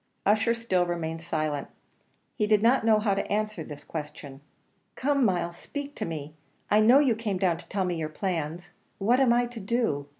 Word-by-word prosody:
Ussher 220 +3 +3
still 210 -6 +1
remained 165 -2 -3
silent; 155 -4 -2 0.7
he 210 - 0
did 210 0 +3
not 240 +1 +4
know 220 -1 +5
how 210 -1 +1
to 195 - -3
answer 215 -3 -1
to 155 - -8
this 145 -1 -8
question. 145 -3 -7 0.5
"Come, 280 0 +1
Myles, 175 -5 0
speak 285 -1 -6
to 215 - -2
me. 155 -2 -6 0.4
I 210 - +6
know 230 +5 +7
you 280 -4 +4
came 215 -3 -2
down 180 -3 +1
to - - -13
tell 195 -2 0
me 175 -2 -1
your 155 -1 -2
plans. 170 0 -3 0.3
What 235 +6 +3
am 260 -3 +4
I 240 +1 +3
to 240 -1 -8
do? 200 - -1
195 Hz, 200 wpm, -27 LUFS, 165-230 Hz, 0.7 s, know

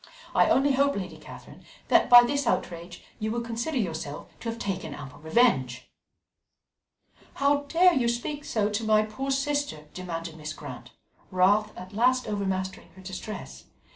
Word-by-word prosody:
I - - +4
only 280 +1 +4
hope, 280 +1 +2
Lady 190 -2 -5
Catherine, - - -13 0.3
that - - +4
by 245 -1 +10
this 280 +1 -1
outrage 170 -3 -2 0.2
you 215 - -2
will 235 +1 -1
consider 235 +6 -3
yourself 160 - -4
to 230 - -4
have 230 - -4
taken 195 -4 -4
ample 135 -3 -10
revenge." 150 - +1 1.4
"How 285 +1 +2
dare 355 +3 +5
you 250 -6 +1
speak 240 +5 -2
so 215 -6 0
to 210 +2 -2
my 215 -1 +4
poor 240 +6 -5
sister?" 275 - -1
demanded 165 -3 -6
Mrs. 155 0 -6
Grant, - - -9 0.4
wrath 205 +3 +3
at 185 +2 -9
last 255 +4 +2
overmastering 190 -3 -3
her 190 - -13
distress. 190 +3 -7
215 Hz, 155 wpm, -27 LUFS, 185-255 Hz, 1.4 s, by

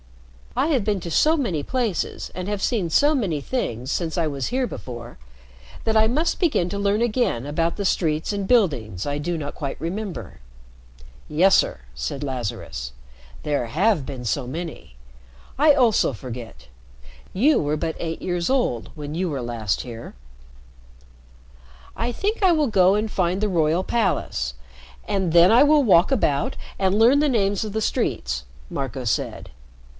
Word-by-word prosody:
"I 265 +4 +2
have 265 -9 +2
been 205 -1 0
to 170 - -6
so 310 - +4
many 195 - -1
places, 235 - -2
and 185 +1 -4
have 205 -1 -2
seen 205 -9 0
so 290 - +4
many 190 - 0
things 130 - -3
since 165 -2 -2
I 170 - +2
was 140 -3 -3
here 255 +2 0
before, 120 - -8 0.7
that 220 - +1
I 220 0 +5
must 300 +9 0
begin 295 - +2
to 200 - -3
learn 200 +2 +1
again 235 - 0
about 165 +3 -1
the 200 - -2
streets 160 0 0
and 200 -1 -3
buildings 130 - +1
I 145 0 -2
do 170 +3 -2
not 145 -2 -5
quite 140 -3 -5
remember." 170 - -5 0.9
"Yes, 180 +6 +5
sir," - - +1
said 60 - -4
Lazarus. 120 - -4 0.5
"There 145 -5 -1
have 175 - +1
been 130 -3 -7
so 120 - -1
many. 155 - -7 0.6
I 295 +2 +6
also 245 - +3
forget. 115 - -9 0.6
You 280 +11 +3
were 150 0 0
but 160 +1 -2
eight 165 -1 -4
years 175 -2 -1
old 245 - 0
when 150 -1 -6
you 180 +1 -1
were 140 -4 -3
last 115 -4 -2
here." 115 - -9 1.8
"I 235 +2 -1
think 410 - -2
I 375 - +6
will 310 -4 +2
go 190 -3 +4
and 215 +1 -1
find 185 -1 0
the 215 - +1
royal 170 -1 +1
palace, 65 - -1 0.5
and 190 -4 0
then 175 +3 +7
I 235 - +7
will 295 0 +5
walk 185 -2 +5
about 145 - +1 0.2
and 190 +1 +2
learn 245 +5 +6
the 300 0 +3
names 200 -5 +1
of 215 - -5
the 220 +2 -2
streets," 65 - -1 0.3
Marco 135 -2 -4
said. 110 - -2
175 Hz, 165 wpm, -23 LUFS, 140-220 Hz, 1.8 s, then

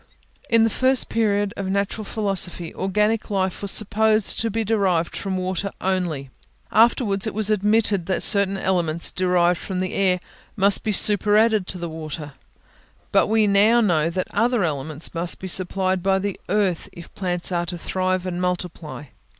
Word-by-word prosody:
In 230 -1 +4
the 225 - +2
first 260 +2 +1
period 205 -3 0
of 195 -1 -4
natural 200 +2 -1
philosophy, 195 -5 -3
organic 210 +3 0
life 190 -3 -1
was 200 - -2
supposed 215 +1 +3
to 225 - 0
be 225 +1 -1
derived 190 -6 0
from 190 -1 -3
water 185 +2 -2
only; 175 -8 -2 0.4
afterwards, 220 -3 +3
it 215 - -4
was 215 0 +2
admitted 210 -3 +1
that 190 - -1
certain 200 -2 +2
elements 170 -4 0
derived 180 -2 +1
from 185 -2 -4
the 185 0 -3
air 185 -2 +2 0.4
must 200 -1 +3
be 215 - 0
superadded 210 0 +3
to 185 - 0
the 170 -1 -5
water; 155 -2 -7 0.8
but - - +3
we 220 0 +3
now 210 +4 +4
know 165 -8 +2
that 185 +2 -2
other 230 0 +1
elements 155 0 -3
must 170 +1 -2
be 190 - -7
supplied 185 0 -1
by 190 +1 +2
the 195 0 -3
earth, 195 -3 0
if 170 - -13
plants 180 -1 -2
are 175 -1 -1
to 175 - -4
thrive 185 +1 -2
and 180 -1 -3
multiply. 180 -4 -4
190 Hz, 165 wpm, -22 LUFS, 180-210 Hz, 0.8 s, In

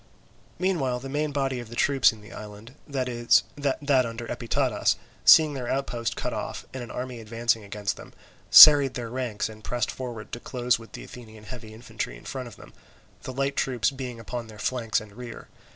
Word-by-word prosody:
Meanwhile 150 -10 0
the 135 +2 -8
main 150 +2 -1
body 135 -2 -1
of 120 -2 -9
the 120 - -9
troops 135 +2 +4
in 110 -2 -14
the 105 - -13
island 105 +3 -10
(that 135 -3 -2
under 125 0 +1
Epitadas), 120 -1 0 0.3
seeing 155 -2 +8
their 130 -3 -5
outpost 120 -4 -2
cut - - -3
off - - -5
and 130 - -5
an 120 - -8
army 125 -1 -5
advancing 115 0 -1
against 100 0 -4
them, - - -12 0.4
serried 145 -3 +10
their 120 -2 -5
ranks 125 -5 -2
and 110 -1 -12
pressed 120 +2 -2
forward 120 -5 -7
to 120 - -5
close 125 -1 0
with 115 - -14
the - - -8
Athenian 110 -3 -12
heavy 110 -1 -9
infantry 110 - -6
in - - -17
front 130 -2 -5
of 115 - -12
them, - - -15 0.5
the - - -6
light 135 +2 -1
troops 125 0 0
being 130 -3 -7
upon 115 +1 -6
their 110 -1 -12
flanks 115 0 -1
and 110 -1 -12
rear. 120 +1 -10
120 Hz, 190 wpm, -26 LUFS, 115-135 Hz, 0.5 s, serried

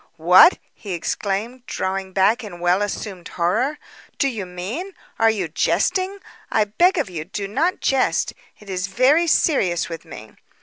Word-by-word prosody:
"What!" 180 - +7 0.2
he 200 -3 -7
exclaimed, 210 +8 -3
drawing 190 0 -3
back 200 +6 +2
in 185 -5 -9
well 175 +3 +2
assumed 195 -3 -4
horror. 215 - 0 0.4
"Do 275 - +2
you 210 -7 -5
mean 225 - -6 0.2
are 225 0 +5
you 200 -6 -1
jesting? 375 - 0 0.3
I 215 - +3
beg 350 - +2
of 300 - 0
you, 170 -4 -5
do 195 +4 -5
not 310 - 0
jest. 270 -1 +1 0.3
It 210 - -16
is 185 -1 -3
very 265 - +3
serious 190 - +2
with 165 -1 -7
me." 110 -10 -11
200 Hz, 160 wpm, -21 LUFS, 180-260 Hz, 0.4 s, What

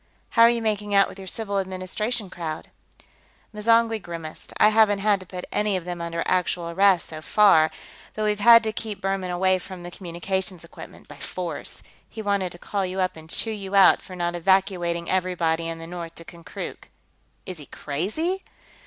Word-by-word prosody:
"How 230 - +2
are 230 - +9
you 235 -1 0
making 210 -2 -1
out 195 0 +6
with 195 - -11
your 190 - -9
Civil 200 0 -1
Administration 190 +3 -3
crowd?" 160 -3 -6 0.8
M'zangwe 225 +1 +2
grimaced. 165 -3 -8
"I 210 - +6
haven't 215 -2 +4
had 200 0 +2
to 185 - -12
put 180 0 -6
any 210 -2 +1
of 175 - -7
them 175 -1 -5
under 170 0 -2
actual 180 -2 0
arrest, 190 0 +4
so 155 -1 -8
far, 160 -4 +5 0.5
but 215 - -2
we've 210 -1 +1
had 230 +2 +8
to 220 - -1
keep 215 -3 -5
Buhrmann 195 -1 -2
away 185 +1 +2
from 185 -1 -9
the 175 - -7
communications 180 0 -3
equipment 170 - -12
by - - -12
force. - - -6 0.3
He 220 - -7
wanted 200 -3 0
to - - -10
call 200 +2 -2
you 185 +1 -3
up 185 -1 0
and 160 0 -13
chew 225 - 0
you 200 -2 -5
out 195 -1 +7
for 185 - -10
not 175 -1 -1
evacuating 175 -1 +1
everybody 170 -3 0
in 165 0 -4
the 165 - -8
north 170 -1 -7
to 165 - -11
Konkrook." 170 0 -8 0.6
"Is 185 -3 -6
he 145 - -11
crazy?" 220 - -3
185 Hz, 190 wpm, -24 LUFS, 175-210 Hz, 0.8 s, are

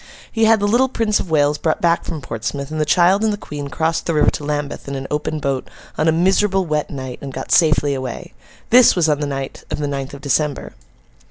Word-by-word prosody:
He 225 -1 +2
had 220 0 +5
the 205 - +1
little 245 +5 +3
Prince 225 -4 0
of - - -5
Wales 145 -1 +2
brought 160 -1 0
back 170 0 +2
from 155 -4 -5
Portsmouth; 120 +5 -5
and 155 0 -2
the - - +1
child 180 +6 +4
and 220 - +2
the 205 - -2
Queen 145 -7 -7
crossed 160 +3 -1
the 165 - 0
river 150 - +4
to - - -6
Lambeth 145 -1 -4
in 140 - -4
an 135 0 -5
open 150 +1 -2
boat, 140 -3 -2 0.3
on 155 - 0
a - - +5
miserable 190 +3 +2
wet 150 -2 -1
night, 130 -3 -6
and 140 - -6
got - - -6
safely 155 -3 +4
away. 130 -3 -6 0.4
This 245 0 +7
was 175 -3 +2
on 150 -2 +1
the 145 - -2
night 135 -1 -5
of - - -3
the 150 - -2
ninth 140 -1 -4
of 140 - -11
December. 145 +1 -1
150 Hz, 240 wpm, -19 LUFS, 140-175 Hz, 0.4 s, This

